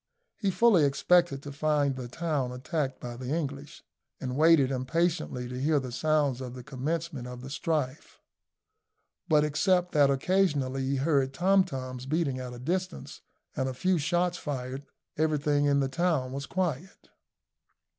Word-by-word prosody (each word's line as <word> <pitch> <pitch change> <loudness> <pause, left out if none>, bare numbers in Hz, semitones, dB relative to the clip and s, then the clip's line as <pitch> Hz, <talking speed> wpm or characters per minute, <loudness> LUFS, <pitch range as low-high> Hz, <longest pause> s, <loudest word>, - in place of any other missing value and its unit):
He 200 - -1
fully 195 -4 +4
expected 140 +1 +3
to 145 - -7
find 145 -1 +1
the 130 -2 -6
town 145 -2 -2
attacked 135 +2 -3
by 120 -1 -6
the 125 +1 -7
English, 145 -2 -4 0.4
and 130 -1 -4
waited 155 -3 +5
impatiently 145 0 -1
to 125 +1 -5
hear 150 +1 +3
the 130 -2 -6
sounds 145 -1 +1
of 125 -1 -6
the 125 - -8
commencement 150 0 -3
of 125 0 -8
the 135 - -8
strife; 150 -3 -3 1.1
but, 150 -1 +5
except 180 +4 +2
that 145 -3 +4
occasionally 140 -3 +1
he 140 - 0
heard 135 -1 +1
tom 190 +3 +4
toms 130 -5 -6
beating 145 -3 0
at 125 -1 -6
a 125 - -8
distance, 180 +8 -4 0.3
and 130 0 -1
a 130 - -6
few 185 +5 +1
shots 175 +3 0
fired, 135 -1 -5 0.3
everything 150 -2 +2
in 140 -1 +3
the 135 - +1
town 140 -3 0
was 140 +1 -5
quiet. 185 -1 -3
145 Hz, 155 wpm, -28 LUFS, 130-165 Hz, 1.1 s, waited